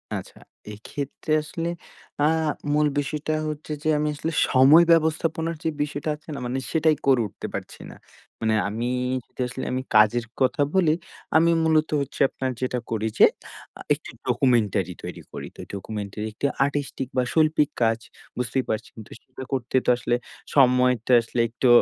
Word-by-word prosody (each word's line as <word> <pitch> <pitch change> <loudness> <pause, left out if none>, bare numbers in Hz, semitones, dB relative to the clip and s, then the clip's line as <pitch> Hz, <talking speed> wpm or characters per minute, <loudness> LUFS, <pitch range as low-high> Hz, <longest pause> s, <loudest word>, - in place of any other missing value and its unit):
আচ্ছা। - - -8 0.3
এইক্ষেত্রে 140 +8 -6
আসলে 165 +2 -4 0.5
আ - - +5 0.5
মূল 150 0 +3
বিষয়টা 150 +2 -2 0.2
হচ্ছে 150 0 -7
যে, 155 - -2
আমি 150 +1 0
আসলে 160 +3 -3 0.2
সময় 140 +6 +7
ব্যবস্থাপনার 160 0 +1
যে 160 - +1
বিষয়টা 145 +1 -4
আছে 155 +1 -19
না? 140 - -5
মানে 130 +2 -2
সেটাই 160 -1 +3
করে 130 -3 +5
উঠতে - - -8
পারছি - - -7
না। - - -12 0.5
মানে 110 -1 +2 0.2
আমি 115 +4 -2 0.5
তো - - -25
আসলে 130 +1 -6
আমি 130 +1 -1
কাজের 110 +3 +5 0.2
কথা 145 +5 +2
বলি, 170 -5 +4 0.4
আমি 170 +1 +4
মূলত 160 -1 +3
হচ্ছে 140 - -5
আপনার 130 -1 -3
যেটা 125 -1 -1
করি 110 -1 0
যে - - +10 0.5
আ - - -19
একটি - - -7 0.2
ডকুমেন্টারি 105 -8 +2
তৈরি - - -7
করি। - - -7
তো - - -25
এই - - -13
ডকুমেন্টারি 105 +1 -5
একটি 110 - -3 0.2
আর্টিস্টিক 140 -2 -3
বা 125 - +4
শৈল্পিক 155 -2 +3
কাজ 115 0 +2 0.4
বুঝতেই 125 +2 -1
পারছেন। 110 +1 -3
তো - - -19
সেইটা 130 0 -11
করতে 130 -1 -2
তো - - +2
আসলে 120 0 0 0.4
সময়টা 125 -3 +4
আসলে 115 +1 -5
একটু 125 +3 0
130 Hz, 165 wpm, -24 LUFS, 120-155 Hz, 0.5 s, যে